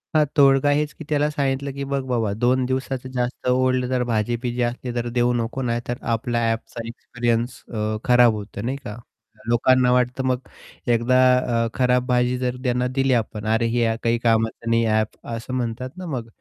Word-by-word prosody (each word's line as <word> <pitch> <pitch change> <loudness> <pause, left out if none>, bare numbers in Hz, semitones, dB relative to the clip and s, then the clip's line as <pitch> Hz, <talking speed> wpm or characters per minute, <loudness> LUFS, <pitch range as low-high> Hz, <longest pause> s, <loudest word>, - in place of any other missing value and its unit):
हां, 155 - +5
तोडगा 135 0 +5
हेच 150 +1 +1
की 155 - -6
त्याला 150 0 +2
सांगितलं, 140 -2 -1
की 140 - -5
बघ 140 0 -1
बाबा 115 -5 0
2 125 +4 +1
दिवसाचं 130 0 -3
जास्त 125 0 -3
ओल्ड 130 0 +2
तर 125 -1 +1
भाजी-बिजी 120 +2 -1
असली 120 +1 -3
तर 120 0 -1
देऊ 120 0 +3
नको 120 +2 -2
नाही 120 -1 -1
तर 120 - -2
आपल्याला 115 -1 0
ॲपचा 115 0 -5
एक्सपिरियन्स 120 0 -2
अ, 110 0 -1
खराब 125 -2 +5
होतो, 100 -1 -7
नाही 130 +5 -2
का 105 -1 -6 0.5
लोकांना 125 +1 +4
वाटतं 125 +1 +1
मग 125 -1 +1 0.5
एकदा 120 +2 +2 0.5
अ, - - 0
खराब 125 -1 +2
भाजी 125 0 +2
जर 125 0 -2
त्यांना 125 -1 +1
दिली 135 -1 +2
आपण 110 -2 -2
अरे 115 +1 +1
हे 115 -2 +2
काही 115 0 +2
कामाचं 115 0 0
नाही 115 0 +3
ॲप 110 -1 -1
असं 115 +3 -7
म्हणतात 125 0 -3
ना, 185 - -6
मग 130 -8 -4
125 Hz, 185 wpm, -22 LUFS, 115-130 Hz, 0.5 s, हां